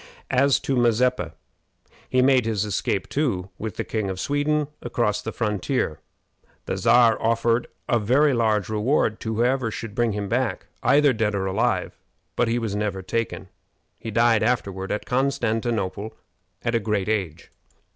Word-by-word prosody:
As 135 +1 +4
to 135 - -1
Mazeppa, 120 -7 +2 0.8
he 130 0 +3
made 130 -3 +4
his 105 -2 0
escape 100 -1 -1
too, 100 -11 -1
with 110 -1 -5
the - - -2
King 110 -3 -2
of 95 -1 -4
Sweden, 145 +3 0
across 110 -3 -1
the 110 - -4
frontier. 105 - -1 0.7
The - - -2
Czar 115 -1 +4
offered 115 +1 +1 0.2
a 120 - +2
very 135 +7 +3
large 110 -4 +1
reward 110 +1 +1
to 110 0 -3
whoever 125 +1 +1
should 110 -1 -6
bring 120 -1 +1
him 100 -1 -3
back, 125 +4 -1 0.2
either 145 -1 +4
dead 110 -2 0
or 95 -1 -1
alive; 95 - -1 0.4
but 120 - +2
he 115 +1 +1
never 105 -3 -2
was - - -18
taken. 115 -3 -3 0.5
He 115 - -6
died 115 0 +3
afterward 100 -5 -1
at 105 - -2
Constantinople 115 -5 -1 0.5
at 115 - -1
a 115 - +3
great 105 -2 -1
age. 95 -7 -2
115 Hz, 155 wpm, -24 LUFS, 105-125 Hz, 0.8 s, As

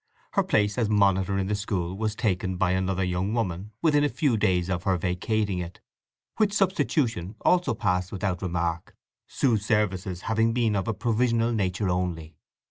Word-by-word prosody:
Her - - +2
place 105 +3 +1
as 110 -3 +1
monitor 100 -2 +2
in 95 - 0
the 105 - -1
school 95 -3 -2
was 110 +1 -2
taken 95 -4 -1
by 90 0 +2
another 95 0 0
young 90 +4 -1
woman 100 -3 -2
within 150 -3 +4
a 145 - +2
few 140 -6 +1
days 95 -5 +1
of 90 -2 -1
her 95 0 +1
vacating 95 +3 -1
it, 85 0 -7 0.6
which 210 -2 +2
substitution 135 - 0
also 180 -10 +2
passed 90 -4 0
without 95 -2 -2
remark, 85 -3 -2 0.3
Sue's 115 -7 +1
services 95 -4 0
having 115 +1 +1
been 115 -3 +1
of 95 -2 -1
a 110 - -1
provisional 115 +1 +1
nature 95 -2 0
only. 90 -3 -2
100 Hz, 170 wpm, -26 LUFS, 90-115 Hz, 0.6 s, within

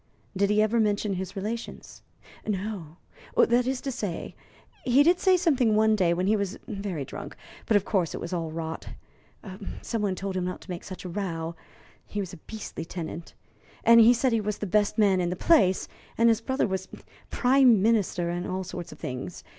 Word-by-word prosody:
"Did 200 +1 +2
he 210 +1 +4
ever 225 +2 +1
mention 210 -1 +1
his 190 +1 -5
relations?" 220 +4 -6 0.5
"No. 190 -5 -4 0.4
That 240 +1 +4
is 260 -1 -1
to 275 - -3
say, 205 -8 -4 0.5
he 260 +3 +5
did 350 +3 +4
say 375 -1 +4
something 260 - +2
one 220 0 +4
day 180 -5 +2
when 180 +2 0
he 210 +3 +3
was 200 -1 -2
very 195 -8 -4
drunk; - - -8 0.3
but, 215 - +5
of 200 - -2
course, 185 -6 0
it - - -5
was 170 - -5
all 165 -2 -2
rot. 160 0 -5 0.9
Some 230 -2 -2
one 200 -3 0
told 195 0 -4
him 185 - -1
not 180 - -4
to 185 - -9
make 175 - -5
such 185 -1 -9
a - - -4
row 170 -3 -3 0.5
he 210 - -5
was 185 -3 -4
a - - -8
beastly 215 0 -7
tenant 165 0 -7 0.5
and 230 0 +7
he 225 +2 +8
said 250 +2 +1
he 225 -1 +2
was 210 0 -2
the - - -4
best 205 +3 +1
man 195 -4 +4
in 175 - 0
the 180 - -2
place, 190 - +3 0.3
and 230 +1 +5
his 225 0 +2
brother 260 +3 0
was 190 -1 -3 0.4
Prime 250 -5 +4
Minister, 200 -6 +1
and 175 +1 -3
all 185 +1 -2
sorts 175 -1 -7
of 150 - -11
things. 130 +7 -6
200 Hz, 200 wpm, -27 LUFS, 180-225 Hz, 0.9 s, he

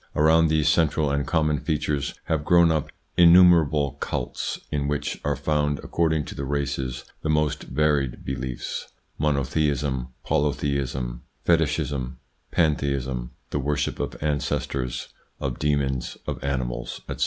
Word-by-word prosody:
Around 80 +2 +5
these 75 -1 +2
central 75 -2 +3
and 70 0 0
common 75 -3 +2
features 75 -1 -1
have 80 -2 -1
grown 85 +1 +5
up 80 -3 0 0.3
inumer 90 0 +8
able 70 -1 0
cults 60 - -3
in 70 -1 0
which 75 0 -2
are - - +1
found, 75 -1 0
according 80 -3 +1
to - - -7
the 70 - -5
races, 70 -2 -2 0.2
the 80 - -2
most 75 -1 +1
varied 70 -2 0
beliefs: 65 -2 -4 0.3
monotheism, 70 -2 0 0.2
polytheism, 70 -4 -1 0.2
fetichism, 70 -6 +1 0.3
pantheism, 70 -5 0 0.2
the 75 - 0
worship 70 +1 -1
of - - -3
ancestors, 70 -4 -2 0.3
of 65 -3 -3
demons, 70 -4 0
of - - -4
animals, - - -3
etc. - - -5
70 Hz, 130 wpm, -25 LUFS, 65-75 Hz, 0.3 s, inumer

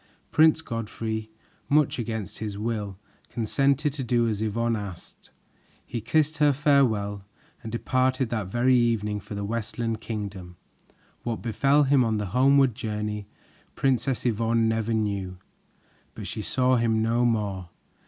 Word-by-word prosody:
Prince 160 0 +5
Godfrey, 110 -2 -4 0.4
much 150 -3 +3
against 110 -3 -4
his 105 -2 -4
will, 105 -3 -3 0.3
consented 135 +5 +1
to 140 -2 -4
do 120 -1 +2
as 105 -2 -2
Yvonne 115 +2 0
asked. 100 -5 -9 0.6
He 120 -1 -4
kissed 155 +6 +1
her 145 -1 +4
farewell 115 -9 +2 0.4
and 110 - -7
departed 130 +1 +1
that 110 -5 -2
very 120 +5 +3
evening 110 -4 +1
for 105 - -8
the 100 0 -3
Westland 115 +1 -3
Kingdom. 100 -5 -6 0.7
What 115 -2 -4
befell 140 +5 +3
him 135 -2 +4
on 110 -2 0
the 105 - -2
homeward 135 0 +5
journey, 105 -2 -4 0.5
Princess 135 -1 0
Yvonne 115 0 +2
never 110 0 0
knew, 100 -4 -2 0.8
but - - -7
she 110 - -4
saw 130 +3 +2
him 110 -1 +2
no 115 +2 +2
more. 100 -6 -1
115 Hz, 140 wpm, -26 LUFS, 105-130 Hz, 0.8 s, Prince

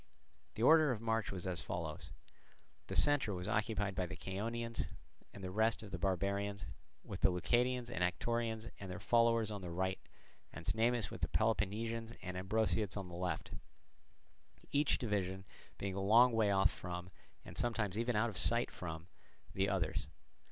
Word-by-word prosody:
The 110 - -2
order 155 +1 +7
of 115 - -2
march 115 -1 0
was 95 -2 -5
as 90 -3 -1
follows: 80 -3 -5 0.8
the - - -4
centre 145 -9 +5
was 90 +1 -4
occupied 105 -1 0
by 90 -1 -1
the 95 - -6
Chaonians 115 +5 -3 0.4
and 100 - -11
the 95 - -4
rest 110 +3 +2
of 105 - -10
the 90 - -4
barbarians, 100 +2 -1 0.4
with - - -7
the - - +6
Leucadians 120 +7 +1
and 90 - -1
Anactorians 115 +4 -1
and 95 - -7
their 90 - -5
followers 115 -2 +3
on 100 -1 -5
the 90 - -5
right, 95 +2 -1 0.5
and 85 - -9
Cnemus 115 0 +1
with - - -8
the - - +2
Peloponnesians 115 +2 0
and 90 0 -5
Ambraciots 105 +1 0
on 95 -2 -5
the 85 - -8
left; 90 -3 -3 1.2
each 145 0 +3
division 95 -4 -2 0.3
being 100 -1 -3
a 95 - -2
long 115 +6 +6
way 110 -2 +3
off 95 0 +4
from, 90 0 -6 0.3
and - - -10
sometimes 110 -5 -1
even 115 +1 0
out 110 +2 +2
of 95 - -6
sight 120 +1 +3
of, 80 -2 -5 0.5
the 95 +1 +1
others. 90 -6 -1
100 Hz, 170 wpm, -36 LUFS, 95-115 Hz, 1.2 s, order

